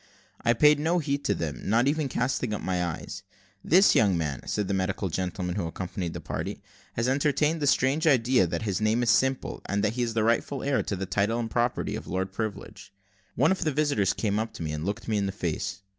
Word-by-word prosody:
I 120 Hz, -, +4 dB
paid 150 Hz, +4 st, +5 dB
no 165 Hz, +4 st, +1 dB
heed 145 Hz, -3 st, -1 dB
to -, -, +2 dB
them, 75 Hz, -4 st, -4 dB
not 115 Hz, +5 st, +2 dB
even 150 Hz, -1 st, 0 dB
casting 125 Hz, -3 st, -1 dB
up -, -, -6 dB
my 90 Hz, -1 st, 0 dB
eyes. 90 Hz, +3 st, -5 dB, 0.4 s
"This 190 Hz, +5 st, +5 dB
young 100 Hz, -5 st, +3 dB
man," 75 Hz, -4 st, -2 dB
said 105 Hz, -2 st, -1 dB
the 100 Hz, -, -1 dB
medical 95 Hz, 0 st, -1 dB
gentleman 90 Hz, +1 st, -3 dB
who 90 Hz, -5 st, -1 dB
accompanied 90 Hz, 0 st, -5 dB
the -, -, -4 dB
party, -, -, -5 dB, 0.3 s
"has 115 Hz, +2 st, -1 dB
entertained 150 Hz, +3 st, +1 dB
the 145 Hz, -, +1 dB
strange 140 Hz, +5 st, +2 dB
idea 125 Hz, -, +4 dB
that 85 Hz, -, -3 dB
his 100 Hz, -2 st, -1 dB
name 110 Hz, +3 st, +2 dB
is 115 Hz, -, +4 dB
Simple, 130 Hz, +2 st, +1 dB
and 100 Hz, +1 st, 0 dB
that 105 Hz, 0 st, +1 dB
he 125 Hz, -, -2 dB
is 115 Hz, -2 st, -1 dB
the 110 Hz, -, +2 dB
rightful 115 Hz, +4 st, 0 dB
heir 140 Hz, -1 st, +1 dB
to 100 Hz, -, -3 dB
the 95 Hz, +1 st, -3 dB
title 100 Hz, +4 st, 0 dB
and 115 Hz, -2 st, -3 dB
property 120 Hz, 0 st, 0 dB
of -, -, -7 dB
Lord 95 Hz, +2 st, -2 dB
Privilege." 110 Hz, -1 st, -6 dB, 0.4 s
One 145 Hz, +7 st, +3 dB
of 190 Hz, -, 0 dB
the 155 Hz, -, +1 dB
visitors 145 Hz, -9 st, +1 dB
came 105 Hz, -1 st, -1 dB
up 110 Hz, 0 st, -3 dB
to -, -, -5 dB
me, 80 Hz, -, -3 dB
and 75 Hz, +1 st, -4 dB
looked 105 Hz, +2 st, -4 dB
me 110 Hz, -2 st, +1 dB
in 100 Hz, -, 0 dB
the -, -, -2 dB
face. 95 Hz, +1 st, -3 dB
110 Hz, 235 wpm, -27 LUFS, 95-135 Hz, 0.4 s, paid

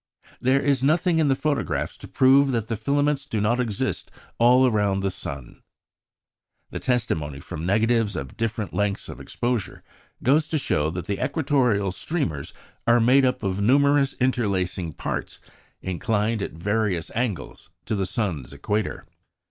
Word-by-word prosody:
There 130 Hz, +2 st, +3 dB
is 140 Hz, -2 st, +1 dB
nothing 160 Hz, +4 st, +2 dB
in 155 Hz, -, +3 dB
the 135 Hz, -, +3 dB
photographs 140 Hz, -, -1 dB
to -, -, -11 dB
prove 135 Hz, +1 st, +5 dB
that 115 Hz, -2 st, -2 dB
the 115 Hz, -, 0 dB
filaments 145 Hz, +5 st, 0 dB
do 110 Hz, -, -2 dB
not 110 Hz, +4 st, +1 dB
exist 110 Hz, -5 st, -2 dB, 0.3 s
all 125 Hz, +2 st, +6 dB
round 100 Hz, -2 st, +1 dB
the 95 Hz, -, 0 dB
sun. 70 Hz, -8 st, -7 dB, 1.1 s
The -, -, -4 dB
testimony 80 Hz, -, -1 dB
from 75 Hz, +4 st, -6 dB
negatives 110 Hz, +1 st, +2 dB
of 65 Hz, -4 st, -6 dB
different 110 Hz, -6 st, -3 dB
lengths 105 Hz, -1 st, -1 dB
of -, -, -8 dB
exposure 120 Hz, -5 st, -3 dB, 0.4 s
goes 150 Hz, +4 st, +3 dB
to 160 Hz, -, 0 dB
show 75 Hz, -, 0 dB
that 90 Hz, +2 st, -5 dB
the 100 Hz, +3 st, -2 dB
equatorial 130 Hz, -, +1 dB
streamers 90 Hz, -, -3 dB, 0.4 s
are 120 Hz, +1 st, +5 dB
made 130 Hz, +4 st, +5 dB
up 125 Hz, -2 st, 0 dB
of 95 Hz, 0 st, -1 dB
numerous 140 Hz, +4 st, +4 dB
interlacing 95 Hz, -, -1 dB
parts -, -, -4 dB, 0.4 s
inclined 105 Hz, +4 st, -1 dB
at -, -, -4 dB
varying 100 Hz, 0 st, 0 dB
angles 115 Hz, -6 st, -3 dB, 0.2 s
to -, -, -2 dB
the 100 Hz, -3 st, 0 dB
sun's 90 Hz, -, -3 dB
equator." 105 Hz, +9 st, -2 dB
115 Hz, 150 wpm, -24 LUFS, 95-130 Hz, 1.1 s, all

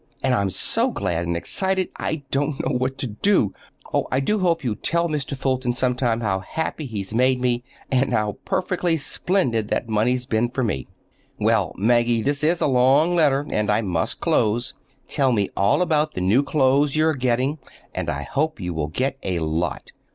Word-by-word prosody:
And 130 Hz, -1 st, +2 dB
I'm 100 Hz, -5 st, +1 dB
so -, -, +1 dB
glad 85 Hz, 0 st, -2 dB
and 85 Hz, 0 st, -1 dB
excited 190 Hz, -, 0 dB
I 155 Hz, -2 st, -3 dB
don't 145 Hz, +1 st, 0 dB
know 130 Hz, -, 0 dB
what 130 Hz, +1 st, -1 dB
to -, -, -3 dB
do. 110 Hz, -, +1 dB, 0.4 s
Oh, -, -, +1 dB
I 130 Hz, -, +2 dB
do 210 Hz, +10 st, 0 dB
hope 170 Hz, -4 st, +1 dB
you'll 115 Hz, -5 st, -2 dB
tell 170 Hz, +6 st, 0 dB
Mr. 145 Hz, -3 st, -3 dB
Fulton 130 Hz, -2 st, 0 dB
some 125 Hz, 0 st, +1 dB
time 120 Hz, -2 st, 0 dB
how 95 Hz, -4 st, 0 dB
happy 155 Hz, +7 st, -4 dB
he's 105 Hz, -3 st, -5 dB
made 130 Hz, +2 st, +3 dB
me, 120 Hz, -1 st, 0 dB, 0.3 s
and 135 Hz, +1 st, +2 dB
how 105 Hz, -1 st, 0 dB
perfectly 180 Hz, -3 st, 0 dB
splendid 135 Hz, -, 0 dB
that 120 Hz, -, -1 dB
money's 125 Hz, +4 st, +1 dB
been 120 Hz, -1 st, 0 dB
for 130 Hz, +1 st, -2 dB
me. 85 Hz, -, -2 dB, 0.5 s
Well, -, -, +1 dB
Maggie, 120 Hz, +2 st, +2 dB
this 145 Hz, +1 st, -1 dB
is 165 Hz, +3 st, +2 dB
a -, -, +3 dB
long 135 Hz, +6 st, +4 dB
letter, 145 Hz, -4 st, +3 dB
and 105 Hz, -1 st, 0 dB
I 105 Hz, +2 st, +3 dB
must 90 Hz, -6 st, -2 dB
close. 115 Hz, +3 st, +1 dB, 0.3 s
Tell 135 Hz, -2 st, +1 dB
me 100 Hz, -5 st, +1 dB
all 100 Hz, -, +3 dB
about 155 Hz, -3 st, +1 dB
the 90 Hz, -, -2 dB
new 100 Hz, +9 st, +4 dB
clothes 140 Hz, 0 st, +2 dB
you 155 Hz, 0 st, +3 dB
are 160 Hz, -, +3 dB
getting, 130 Hz, +3 st, 0 dB, 0.3 s
and -, -, -3 dB
I -, -, -2 dB
hope 155 Hz, +2 st, -1 dB
you 90 Hz, -2 st, -3 dB
will 80 Hz, -2 st, -2 dB
get 130 Hz, -, -2 dB
a 90 Hz, -2 st, -2 dB
lot. 80 Hz, 0 st, -2 dB
130 Hz, 195 wpm, -23 LUFS, 110-150 Hz, 0.5 s, long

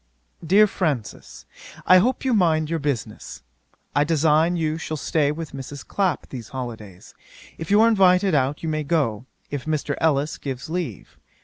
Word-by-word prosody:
'DEAR 195 Hz, +6 st, +5 dB
FRANCIS, 155 Hz, -, -4 dB, 0.4 s
'I 185 Hz, -, +7 dB
hope 255 Hz, +7 st, 0 dB
you 260 Hz, -, +2 dB
mind 160 Hz, -6 st, +2 dB
your 165 Hz, -, 0 dB
business. 145 Hz, -5 st, -4 dB, 0.5 s
I 145 Hz, -, +4 dB
design 160 Hz, +2 st, +2 dB
you 160 Hz, -1 st, -1 dB
shall 155 Hz, -1 st, -4 dB
stay 150 Hz, -1 st, 0 dB
with 160 Hz, 0 st, -6 dB
Mrs. 135 Hz, +1 st, -8 dB
Clapp 195 Hz, -3 st, -1 dB
these 120 Hz, -4 st, -8 dB
holidays. 110 Hz, -8 st, -8 dB, 0.5 s
If 160 Hz, -, -6 dB
you 205 Hz, +2 st, +5 dB
are 225 Hz, -, +6 dB
invited 190 Hz, -3 st, +4 dB
out 140 Hz, +1 st, 0 dB
you -, -, -2 dB
may 155 Hz, -1 st, -1 dB
go, 135 Hz, -7 st, -1 dB, 0.2 s
if 145 Hz, -3 st, -4 dB
Mr. 155 Hz, -2 st, -1 dB
Ellis 150 Hz, -1 st, +1 dB
gives 135 Hz, +2 st, -6 dB
leave. 165 Hz, -, -5 dB
155 Hz, 165 wpm, -23 LUFS, 140-175 Hz, 0.5 s, I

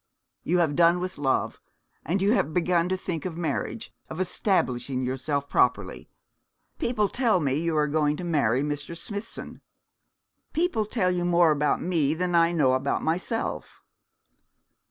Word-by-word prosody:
'You 180 Hz, -, 0 dB
have 160 Hz, -5 st, +2 dB
done 170 Hz, +2 st, +4 dB
with 185 Hz, -3 st, -5 dB
love; 135 Hz, -2 st, 0 dB, 0.4 s
and 185 Hz, +6 st, -1 dB
you 200 Hz, -, +3 dB
have 155 Hz, -, +1 dB
begun 175 Hz, 0 st, +2 dB
to 185 Hz, -, 0 dB
think 175 Hz, -4 st, -4 dB
of 170 Hz, -3 st, -5 dB
marriage, 150 Hz, -10 st, -3 dB, 0.2 s
of 160 Hz, -, -7 dB
establishing 135 Hz, -, 0 dB
yourself 140 Hz, +3 st, -2 dB
properly. -, -, 0 dB, 0.7 s
People 215 Hz, -4 st, +1 dB
tell 230 Hz, -4 st, +1 dB
me 140 Hz, -5 st, 0 dB
you 160 Hz, +2 st, 0 dB
are 150 Hz, -, +3 dB
going 150 Hz, 0 st, +1 dB
to -, -, -6 dB
marry 140 Hz, -7 st, +1 dB
Mr. 145 Hz, +3 st, -4 dB
Smithson.' 205 Hz, +5 st, -6 dB, 0.9 s
'People 315 Hz, -, 0 dB
tell 195 Hz, -5 st, +1 dB
you 175 Hz, -1 st, -1 dB
more 175 Hz, -2 st, +4 dB
about 150 Hz, 0 st, +1 dB
me 160 Hz, -4 st, +1 dB
than 180 Hz, +1 st, -1 dB
I 170 Hz, 0 st, +4 dB
know 145 Hz, -7 st, +3 dB
about 130 Hz, +2 st, 0 dB
myself.' 180 Hz, +8 st, -3 dB
170 Hz, 155 wpm, -26 LUFS, 145-185 Hz, 0.9 s, done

